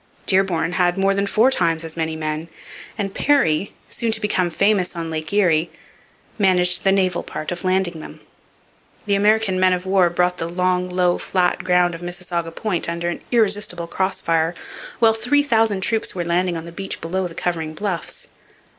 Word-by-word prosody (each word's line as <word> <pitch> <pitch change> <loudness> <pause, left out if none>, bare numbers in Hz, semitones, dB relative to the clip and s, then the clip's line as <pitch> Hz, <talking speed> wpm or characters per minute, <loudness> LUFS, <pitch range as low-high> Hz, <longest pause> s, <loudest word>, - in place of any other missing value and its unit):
Dearborn 180 -4 +1
had 180 0 +1
more 195 0 +2
than 200 +1 0
four 225 +6 +3
times 165 -7 +1
as 160 -1 -5
many 160 -1 -2
men; 155 +1 -3 0.5
and 200 -2 -3
Perry, 200 - +2 0.2
soon 230 -2 -2
to 220 - -1
become 190 -4 0
famous 195 +1 +1
on 165 -1 -4
Lake 155 0 -4
Erie, 175 -6 +2 0.7
managed 180 -3 +3
the 195 - +4
naval 185 -2 +1
part 155 - -6
of 175 -1 -5
landing 185 -3 0
them. - - -10 0.9
The 205 - +1
American 205 -1 +2
men 185 0 +4
of 180 0 -3
war 190 -2 +3
brought 180 +1 0
the 165 - -2
long, 180 +1 0
low, 180 -1 +1
flat 180 -2 0
ground 180 -1 +3
of 165 - -8
Mississauga 175 -1 -4
Point 175 0 -2
under 170 +1 -2
an 175 - -5
irresistible 205 -6 +1
cross 190 +3 -2
fire 165 +1 +1 0.4
while 225 -1 +5
three 245 +6 +1
thousand 225 -7 +2
troops 220 +1 -1
were 175 -2 -2
landing 175 0 0
on 165 - -7
the 170 - -9
beach 195 +3 -4
below 180 +3 -2
the 165 - -12
covering 160 -3 -3
bluffs. 190 -2 -4
180 Hz, 180 wpm, -21 LUFS, 170-195 Hz, 0.9 s, while